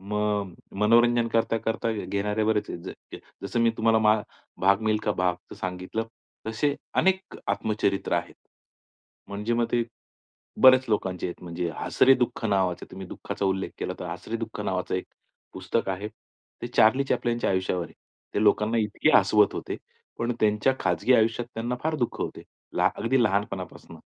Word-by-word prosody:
मग, 105 -1 -1 0.3
मनोरंजन 120 +2 +4
करता 115 0 +1
करता 115 +1 -1
घेणारे 105 0 -1
बरेच 110 -1 +1
आहेत. 85 +2 -9 0.2
जसं 100 +5 -1
मी 115 0 +4
तुम्हाला 110 -1 +4 0.4
भाग 100 +2 +4
मिल्खा 105 -1 +1
भागचं 90 0 -2
सांगितलं, 95 +4 -3 0.4
तसे 140 +6 0 0.3
अनेक 190 0 0
आत्मचरित्र 105 -2 0
आहेत. - - -2 0.9
म्हणजे 105 +4 -2
मग 120 0 +2
ते 120 -1 +3 0.8
बऱ्याच 130 0 +8
लोकांचे 95 -4 -1
आहेत. 85 - -9
म्हणजे 85 0 -3
हसरे 135 +1 +4
दुःख 125 -2 -2
नावाचं, 95 -3 0
तुम्ही 95 0 -8
दुःखाचा 100 - -5
उल्लेख 95 0 0
केला - - -3
तर - - -4
हसरे 115 - -5
दुःख 110 -2 -6
नावाचं 95 -2 -2
एक 90 - -2 0.5
पुस्तक 95 +4 -2
आहे, 100 +3 -4
ते - - -13
चार्ली 130 +6 +5
चॅप्लिनच्या 120 -3 0
आयुष्यावर 95 -2 0
आहे. - - -13 0.4
ते 105 - +1
लोकांना 105 +2 +3
इतके 105 -1 +1
हसवत 105 -1 +4
होते, - - -4 0.4
पण 120 +1 0
त्यांच्या 105 +5 +3
खाजगी 95 +8 +2
आयुष्यात 115 +1 +2
त्यांना 120 +2 -2
फार 160 0 +1
दुःख - - -7
होते. - - -4 0.5
अगदी 125 +2 +1
लहानपणापासून. 100 -2 -3
105 Hz, 145 wpm, -26 LUFS, 95-115 Hz, 0.9 s, बऱ्याच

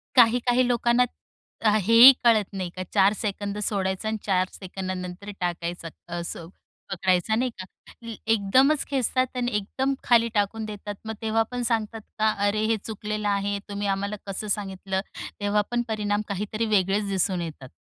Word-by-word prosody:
काही-काही 245 +1 +4
लोकांना 240 0 +3 0.6
अ, 220 - +4
हेही 230 +6 +9
कळत 225 -3 +4
नाही 185 -2 -3
का 185 - -4
4 200 0 +5
सेकंद 205 -1 -3
सोडायचा 190 0 -1
आणि 220 0 -1
4 185 -2 +2
सेकंदानंतर 185 0 -6
टाकायचा, 175 -1 -3 0.3
असं 170 -1 -6 0.4
पकडायचा, 185 +2 +1
नाही 250 +3 0
का? - - -7 0.7
एकदमच 260 +8 +3
खेचतात 255 -1 0
आणि 245 0 -1
एकदम 260 +7 -1
खाली 235 -1 +4
टाकून 210 +2 0
देतात. 205 -1 -7
मग 220 - -4
तेव्हा 225 0 +1
पण 245 0 -3
सांगतात 225 -1 -1 0.2
का, 215 0 +3 0.2
“अरे 215 +1 0
हे 225 0 +1
चुकलेलं 210 -1 -3
आहे, 200 0 0
तुम्ही 205 0 -3
आम्हाला 200 +1 -1
कसं 195 +2 -3
सांगितलं?” 195 -2 -2 0.4
तेव्हा 205 +1 +2
पण 240 0 +1
परिणाम 210 -2 -1
काहीतरी 210 +3 -2
वेगळेच 195 +2 +1
दिसून 190 -2 +1
येतात. 150 -6 -7
205 Hz, 150 wpm, -25 LUFS, 195-225 Hz, 0.7 s, हेही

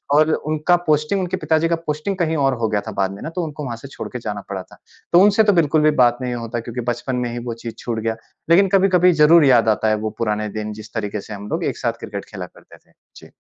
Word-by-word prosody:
और 155 +1 +5
उनका 155 +3 +1
पोस्टिंग 150 +6 +2
उनके 185 +1 -2
पिता 160 -1 +1
जी - - +3
का 170 - +2
पोस्टिंग 155 +6 -2
कहीं 160 -3 0
और 135 - +2
हो 110 - +2
गया 105 -1 0
था - - -3
बाद 95 0 +1
में 100 - -11
ना - - -4
तो 180 - -1
उनको 150 -1 -6
वहाँ 120 -3 -4
से 135 - -10
छोड़ - - -6
के 125 - -4
जाना 105 -3 -5
पड़ा 95 -2 -4
था। - - -18 0.4
तो 175 - +7
उनसे 205 +2 +5
तो 205 -1 +4
बिल्कुल 155 -3 +3
भी 155 0 +4
बात 120 -1 +4
नहीं 125 -1 -2
होता 115 0 -4
क्योंकि 120 +1 -5
बचपन 125 +2 -4
में - - -3
ही 120 - -4
वो 120 - -3
चीज़ 115 -1 -6
छूट 115 -2 -3
गया। 115 0 -2 0.3
लेकिन 195 +4 +6
कभी-कभी 185 -2 +4
ज़रूर 160 0 +7
याद 120 -4 +5
आता 110 0 +1
है 110 - +2
वो - - -3
पुराने 105 -1 -1
दिन 105 0 -4
जिस 110 +1 -14
तरीके 105 -2 -3
से 110 - -9
हम 100 0 -8
लोग 170 +2 -2
एक - - -2
साथ 115 -2 -1
क्रिकेट 100 -1 -6
खेला 95 -4 -7
करते - - -18
थे। - - -32 0.2
जी। - - -14
125 Hz, 275 wpm, -20 LUFS, 110-160 Hz, 0.4 s, तो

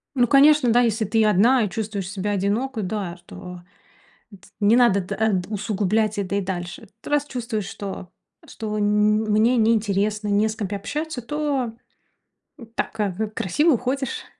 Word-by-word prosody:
Ну 245 -2 +3
конечно, 280 -1 +5
да. 240 +2 +5
Если 225 -2 +1
ты 220 +2 +2
одна 225 +5 +4
и 210 - -1
чувствуешь 205 -2 -4
себя 195 +1 -3
одиноко, 215 +5 -1
да, 185 -3 -4
то 180 -1 -10 0.7
эт 200 - -16
не 210 +2 +4
надо, 235 -5 +4
т 190 +2 -5
э 220 +1 +1
т 180 - -12
усугублять 210 +1 0
это 200 -1 -2
и 200 - +1
дальше. 175 -2 -5
Т - - -9
раз 290 -1 +1
чувствуешь, 230 -6 -4
что 190 -2 -7 0.4
что 215 -1 -5
н 210 +1 +2
мне 225 +4 +3
неинтересно, 210 -2 +1
не 205 +1 +2
с 220 - -4
кем 210 -3 -3
пообщаться, 275 - -4
то, 280 -2 -2 0.9
м, 235 - -11
так, 225 - -3
э, 205 -2 +1
в 220 +2 -2
красиво 255 - +1
уходишь. 255 +2 -3
215 Hz, 170 wpm, -23 LUFS, 200-240 Hz, 0.9 s, конечно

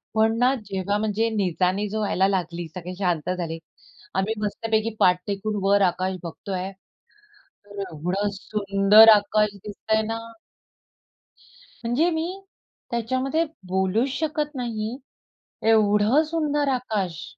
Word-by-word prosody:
पण 220 +1 +3
ना, 250 +2 +3
जेव्हा 195 +1 -1
म्हणजे 220 +1 0
निचानी 190 -1 0
जो 215 +1 -3
व्हायला 195 -2 +2
लागली, 175 -3 -2
सगळे 180 0 -6
शांत 175 -4 0
झाले. 165 -2 -4 0.6
आम्ही 195 +3 0
मस्तपैकी 220 +1 -1
पाठ 180 0 +4
टेकून 205 +1 -2
वर 200 +1 +4
आकाश 185 +1 -3
बघतोय, 185 +3 -5 0.9
तर 205 0 -10
एवढा 180 +6 -2
सुंदर 200 +2 +5
आकाश 210 +1 +1
दिसतंय 220 +1 -1
ना. 225 0 -2 1.7
म्हणजे 265 +9 +2
मी 320 +2 -1 0.6
त्याच्यामध्ये 260 +7 0 0.2
बोलूच 190 +7 +1
शकत 300 -2 -2
नाही, 235 -1 -3 0.7
एवढं 215 +6 +4
सुंदर 295 -3 0
आकाश. 200 -9 -3
210 Hz, 115 wpm, -24 LUFS, 190-230 Hz, 1.7 s, सुंदर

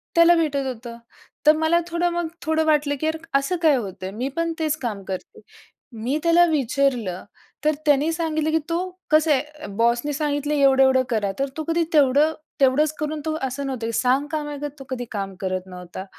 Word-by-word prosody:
त्याला 335 +1 +7
भेटत 290 -4 0
होतं. 235 -1 -6 0.5
तर 305 - +9
मला 320 +2 +3
थोडं, 345 +1 0
मग 345 -1 -2 0.2
थोडं 315 0 +1
वाटलं 295 -2 +2
की - - -2
यार 315 0 0 0.2
असं 275 +7 -2
काय 315 -4 +5
होतंय? 190 -5 -5
मी 235 +6 -3
पण 335 0 0
तेच 310 -2 +1
काम 210 -5 -3
करते. 190 -1 -7 0.6
मी 265 +6 0
त्याला 340 +1 +5
विचारलं? 260 - 0 0.4
तर 305 - +5
त्याने 295 +2 +3
सांगितलं 315 -2 -1
की 320 - +3
तो 335 - +1 0.3
"कसं 310 0 +4
आहे, 265 - +4
अ, 300 +1 -12
बॉस 235 +1 +3
ने 295 - -1
सांगितलं 290 0 -1
"एवढं-एवढं 265 -2 +4
करा." 210 -4 0
तर 275 0 0
तो 315 - -2
कधी 335 +1 +2
तेवढं 290 +1 +4 0.3
तेवढंच 285 +3 +3
करून, 305 0 -3
तो 315 - -1
असं 270 +1 -3
नव्हतं 240 -4 -3
की - - -2
सांगकाम्यागत 290 +2 -1
तो - - -8
कधी 250 -2 -4
काम 195 -3 -4
करत 185 -1 -2
नव्हता. 180 +1 -8
285 Hz, 190 wpm, -23 LUFS, 245-315 Hz, 0.6 s, तर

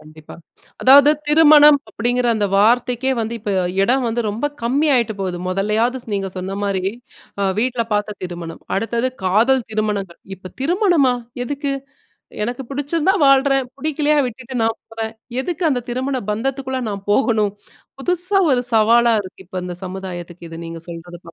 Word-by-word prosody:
கண்டிப்பா. 155 0 -14 0.5
அதாவது 280 +2 +8 0.2
திருமணம் 300 -1 +7
அப்படிங்கிற 240 +4 -1
அந்த 210 -2 0
வார்த்தைக்கே 245 +4 +2
வந்து, 225 +1 -3
இப்ப 205 - -4 0.3
எடம் 255 +5 +2
வந்து 230 +1 -1
ரொம்ப 230 +8 -2 0.2
கம்மி 275 +6 +1
ஆயிட்டு 235 -3 +1
போது. 185 -2 -2
மொதல்லையாவது 215 +7 0
ஸ் - - -18
நீங்க 195 -1 -2
சொன்ன 190 +2 -4
மாரி, 195 -2 -1 0.6
அ - - +1
வீட்ல 240 0 0
பாத்த 210 0 -1
திருமணம், 175 -2 -6 0.2
அடுத்தது 235 +4 -1
காதல் 235 +7 +3
திருமணங்கள், 210 -4 -2 0.2
இப்ப, 185 -1 -11
"திருமணமா? 340 - +3 0.3
எதுக்கு? 280 +2 -3 0.7
எனக்கு 245 +3 -3
பிடிச்சிருந்தா 295 +6 0
வாழ்றேன். 270 -1 +4
புடிக்கலையா 300 +1 0
விட்டுட்டு 250 +1 -7
நான் 225 0 0
போறேன். 225 0 -4 0.3
எதுக்கு 350 +4 -4
அந்த 250 -4 0
திருமண 260 +2 -2
பந்தத்துக்குள்ள 265 +3 -2
நான் 200 -1 -6
போகணும்?" 215 -3 +2 0.5
புதுசா 360 +5 +1
ஒரு 250 -1 +2
சவாலா 230 +2 +5
இருக்கு, 190 0 -12
இப்ப 185 0 -5
இந்த 180 - -5
சமுதாயத்துக்கு 180 -2 -7
இது 165 - -8
நீங்க 165 0 -7
சொல்றது 170 +1 -9
தான். 170 - -11
235 Hz, 150 wpm, -19 LUFS, 200-270 Hz, 0.7 s, அதாவது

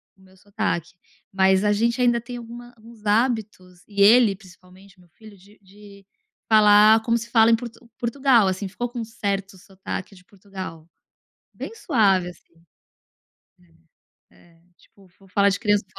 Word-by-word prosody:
o 190 - -27
meu 190 0 -22
sotaque. 195 -4 -4 0.4
Mas 190 0 +2
a 210 - +2
gente 235 +4 0
ainda 240 -1 +2
tem 245 +1 -9
alguma 240 +1 -11
alguns 225 -1 -17
hábitos, 210 -5 -2
e 200 -1 -3
ele 215 0 +5
principalmente 185 0 -19
meu 175 - -23
filho, 215 +4 -17
de 200 +3 -21
de 200 0 -17 0.4
falar 215 0 +6
como 230 0 +1
se 230 0 -8
fala 230 -1 +4
em - - +5
Por 240 +1 -7 0.3
Portugal, 240 -3 +2
assim, 190 +1 -3
ficou 240 +5 -5
com 240 0 -8
um - - -3
certo 200 -3 -5
sotaque 190 +1 -8
de 180 - -19
Portugal. 185 -5 -10 0.7
Bem - - -8
suave, 200 - +1
assim. 175 - -21 1.8
É, 175 - -24
é - - -31 0.2
tipo, 195 -2 -24
vou 195 - -21
falar 200 +1 +2
de 195 - -3
criança 205 -1 0
205 Hz, 160 wpm, -22 LUFS, 190-230 Hz, 1.8 s, falar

